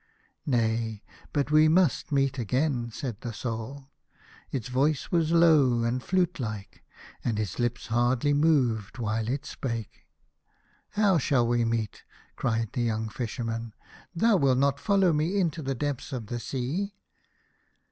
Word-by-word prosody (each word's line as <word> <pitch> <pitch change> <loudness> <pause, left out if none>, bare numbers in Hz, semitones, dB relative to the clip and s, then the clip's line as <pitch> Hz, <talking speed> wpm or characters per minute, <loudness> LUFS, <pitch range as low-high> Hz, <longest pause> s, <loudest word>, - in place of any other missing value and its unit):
" - - -47
Nay, 115 -4 0 0.3
but 145 -1 0
we 155 +1 +6
must 165 -3 +2
meet 135 -1 +1
again," 125 +2 0
said 120 -1 -6
the 120 - -4
Soul. 120 +5 -6 0.6
Its 125 -3 -3
voice 135 +3 0
was 165 -2 +2
low 150 -8 +5
and 120 +2 0
flute 180 +1 0
like, 105 -5 -6 0.4
and 110 -3 -1
its 105 -2 -3
lips 120 0 -1
hardly 120 +4 +2
moved 130 -9 +2
while 110 -1 -1
it 135 +4 -2
spake. 115 -6 -5 0.4
" - - -39
How 195 -5 +4
shall 130 -3 +2
we 120 0 +2
meet? 115 -2 -2 0.2
" - - -30
cried 115 -1 -1
the 125 - -1
young 110 -1 -1
Fisherman. 115 -1 -4 0.2
" - - -23
Thou 220 +4 +4
wilt 135 -5 +3
not 140 +1 +2
follow 195 -2 +3
me 160 +7 +1
into 165 -3 0
the 135 -1 -2
depths 145 0 -3
of 125 -4 -4
the 120 +3 -4
sea 145 - -3
125 Hz, 155 wpm, -27 LUFS, 115-150 Hz, 0.6 s, we